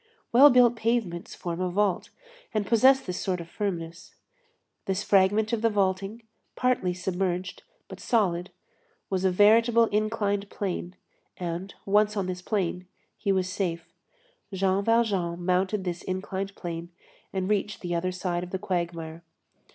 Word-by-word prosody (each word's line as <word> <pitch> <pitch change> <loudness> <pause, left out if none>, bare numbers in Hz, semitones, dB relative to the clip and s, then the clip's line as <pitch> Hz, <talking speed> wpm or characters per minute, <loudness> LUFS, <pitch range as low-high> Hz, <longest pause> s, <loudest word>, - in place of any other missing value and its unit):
Well 270 +5 +8
built 245 -2 +5
pavements 225 -7 -1
form 175 0 -4
a 185 - 0
vault 195 0 0 0.5
and 210 -1 +1
possess 260 +5 +5
this 180 -5 -5
sort 185 -2 -1
of 170 - -8
firmness. 170 -4 -5 0.7
This 195 +1 -1
fragment 205 +3 +3
of 225 - 0
the 230 - +3
vaulting, 200 +2 -1 0.3
partly 250 -8 +1
submerged, 180 0 -2 0.3
but - - -10
solid, 185 -6 +1 0.6
was 190 0 0
a - - +5
veritable 225 +5 +5
inclined 205 -1 0
plane, 185 -2 -4 0.4
and, 175 +2 -5
once 210 +1 +3
on 195 - 0
this 180 0 -4
plane, 180 -3 -2 0.3
he 200 - -1
was 190 -1 +1
safe. 175 -3 -3 0.6
Jean 190 0 +1
Valjean 195 -7 +1
mounted 190 +2 +1
this 175 -1 -3
inclined 190 +1 -4
plane 170 -1 -6 0.4
and 190 -1 -2
reached 210 0 -1
the 175 -1 -3
other 180 +2 0
side 180 -1 -2
of 180 - -7
the 190 - -2
quagmire. 170 -3 -3
190 Hz, 145 wpm, -27 LUFS, 180-210 Hz, 0.7 s, Well